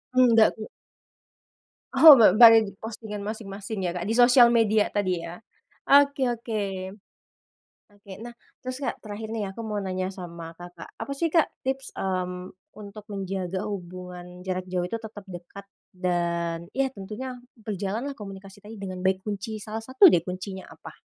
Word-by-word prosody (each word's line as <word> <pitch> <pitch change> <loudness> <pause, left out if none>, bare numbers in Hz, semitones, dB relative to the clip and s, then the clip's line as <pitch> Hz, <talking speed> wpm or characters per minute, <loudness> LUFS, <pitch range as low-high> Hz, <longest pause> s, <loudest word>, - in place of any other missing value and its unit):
Nggak, 230 -3 +6
Kak? 215 -1 -9 1.2
Oh, 295 +2 +10
bar 220 -6 +7
baru 225 -2 +9
di 200 - -7
postingan 220 -1 -7
masing-masing 200 -1 -6
ya, 175 - 0
Kak, 180 +2 -4
di 225 - 0
sosial 245 0 +7
media 220 -3 +3
tadi 185 -4 -1
ya, 170 +1 -7 0.6
oke 280 -1 +5 0.2
oke. 225 -2 -3 1.3
Oke, 205 -1 -17
nah 240 - -8 0.3
terus, 255 +2 -5
Kak, - - -3
terakhir 215 +1 -7
nih 215 -3 -3
ya, - - -6
aku 230 - -6
mau 210 -1 -2
nanya 185 0 -2
sama 170 -3 -9
Kakak, 175 -1 -10
apa - - -5
sih, 335 +4 0
Kak, 330 -3 +4 0.2
tips, 265 +1 -3
mmm, 185 -1 -3 0.2
untuk 210 0 -10
menjaga 190 -1 -3
hubungan 180 -2 -8
jarak 185 -1 -3
jauh 180 -1 0
itu 230 - -4
tetap 215 -2 -10
dekat 180 +2 -10 0.3
dan, 170 -2 -2
ya 270 0 +2
tentunya 220 +5 -7 0.2
berjalan 210 0 -4
lah, 275 - -10
komunikasi 195 -1 -10
tadi 220 +2 -10
dengan 185 -2 -6
baik, 190 0 +1
kunci 210 +1 -5
salah 215 +1 -5
satu 260 - +6
deh, - - +4
kuncinya 190 +1 -7
apa? - - -13
200 Hz, 160 wpm, -25 LUFS, 185-225 Hz, 1.3 s, Oh